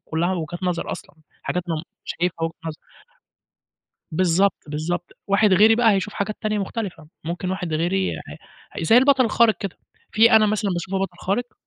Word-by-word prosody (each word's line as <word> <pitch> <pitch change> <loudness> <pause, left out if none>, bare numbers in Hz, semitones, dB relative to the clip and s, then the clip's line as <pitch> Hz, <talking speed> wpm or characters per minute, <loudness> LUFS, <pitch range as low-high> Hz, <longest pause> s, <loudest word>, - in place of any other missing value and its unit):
كُلّها 170 +3 0
وجهات 175 +1 -5
نَظَر 180 -2 -1
أصلًا. - - -10 0.3
حاجات 180 - -2
أنا 165 - 0
م 155 - -4 0.2
شايفها 170 -1 -2
وجهة 165 - -2
نَظَر. 155 -1 -4 1.3
بالضبط، 185 +3 +2
بالضبط. 160 +4 -3
واحد 200 0 +3
غيري 215 +4 +6
بقى 230 -1 +4
هيشوف 200 +2 -1
حاجات 200 +1 -2
تانية 215 -1 -1
مختلفة. 190 -6 -5 0.2
ممكن 175 +2 -3
واحد 185 -3 -3
غيري 185 +4 0 0.6
ح - - -8
زي 225 +8 +5
البَطَل 265 0 +5
الخارق 225 0 +3
كده، 195 -3 -5 0.3
في 230 +3 +5
أنا 215 -1 +6
مثلًا 210 -1 0
باشوفه 185 +2 -2
بَطَل 190 -2 -3
خارق 230 +5 -2
190 Hz, 170 wpm, -22 LUFS, 170-215 Hz, 1.3 s, غيري